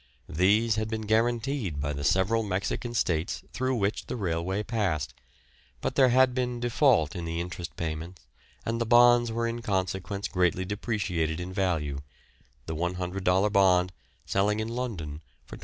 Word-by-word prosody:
These 105 +7 +3
had 110 0 -1
been 110 -1 -3
guaranteed 115 - 0
by 75 +1 -2
the 70 0 -5
several 95 +9 +2
Mexican 105 +4 -2
States 85 -5 0
through 130 0 0
which 105 -2 -1
the - - -3
railway 95 0 -1
passed, 85 - -1 0.7
but - - -2
there 130 -2 +5
had 130 +1 +4
been 125 -1 -1
default 120 - +3
in 85 - -4
the 85 0 -3
interest 90 0 -5
payments, 80 +2 -5 0.4
and 115 +1 -1
the 115 - 0
bonds 120 0 +6
were 115 +1 -1
in 115 0 -3
consequence 95 -1 -2
greatly 90 -1 +1
depreciated 90 -6 -2
in 90 +1 -5
value, 80 -8 -1 0.7
the 80 - -4
$100 90 +3 0
bond 90 -2 +4 0.3
selling 105 +2 +1
in 110 +1 -2
London 100 -12 -4 0.2
for - - -10
$25. - - -17
100 Hz, 155 wpm, -28 LUFS, 85-115 Hz, 0.7 s, bonds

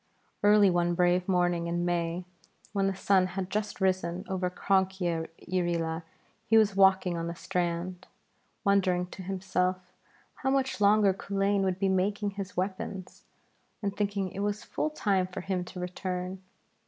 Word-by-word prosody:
Early 205 -1 +6
one 175 0 +1
brave 180 +1 +2
morning 175 -2 +1
in 175 +1 -1
May 175 0 -1 0.5
when 195 -1 +1
the 195 - -1
sun 190 -1 +3
had 190 -1 -3
just 210 0 -2
risen 185 -2 0
over 185 -1 -1
Cronk 190 +1 +1
yn 165 -3 -1 0.2
Irree 175 -1 0
Laa, 160 0 -2 0.5
he 225 - +5
was 210 -3 +4
walking 190 -2 +4
on 165 0 -3
the 170 - -4
strand, 175 +1 -3 0.6
wondering 185 -3 +2
to - - -8
himself 185 -1 -2 0.4
how 265 - -1
much 265 -4 0
longer 205 -1 +5
Culain 195 +1 0
would 190 -2 0
be 195 0 +1
making 200 +2 +1
his 195 -2 -7
weapons 185 0 -4 0.6
and 200 0 -1
thinking 200 -2 -1
it 195 - -7
was 205 +1 -1
full 305 - -2
time 200 -11 +1
for 185 - -6
him 185 -1 -2
to 180 - -9
return. 180 +1 -4
185 Hz, 160 wpm, -29 LUFS, 180-200 Hz, 0.6 s, Early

